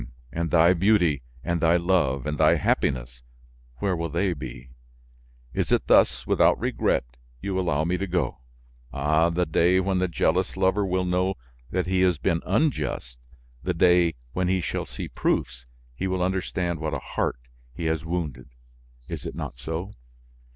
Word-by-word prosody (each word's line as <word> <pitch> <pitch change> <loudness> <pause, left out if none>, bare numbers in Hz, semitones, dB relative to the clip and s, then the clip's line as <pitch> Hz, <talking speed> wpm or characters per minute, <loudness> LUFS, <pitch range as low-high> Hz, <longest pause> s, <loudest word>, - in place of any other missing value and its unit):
and 85 0 -2
thy 85 +2 +5
beauty, 90 -5 +3 0.2
and 85 -1 -1
thy 85 +1 +4
love, 85 -7 +1
and 75 0 -3
thy - - +5
happiness, - - 0 0.6
where 95 +7 0
will 85 0 -3
they 90 +4 0
be? 65 -4 -9 0.8
Is - - -1
it - - +2
thus, - - +4
without - - +3
regret, - - +1 0.4
you 95 +6 -2
allow 85 -5 +1
me 90 +3 0
to 100 - -2
go? 85 -7 -1 0.5
Ah! 80 +4 +2
the 85 +1 0
day 85 +3 +3
when 95 0 0
the 95 - +1
jealous 90 +2 0
lover 95 +2 +2
will 95 -1 0
know 90 +2 +1 0.3
that 90 0 -1
he 95 0 +1
has 90 -3 +3
been 80 +4 0
unjust, 75 - -1 0.4
the 90 0 -2
day 90 -1 +4 0.2
when 90 0 0
he 95 +1 +2
shall 85 - -3
see - - -6
proofs, 60 0 -2 0.3
he 95 +10 -3
will 95 -1 0
understand 90 -2 -1
what 80 -1 -2
a - - -2
heart - - 0 0.3
he 80 +7 -6
has 80 0 0
wounded, 80 -7 -4 0.6
is - - -5
it - - -6
not 60 - -6
so? 80 +9 -4
85 Hz, 165 wpm, -25 LUFS, 80-95 Hz, 0.8 s, thy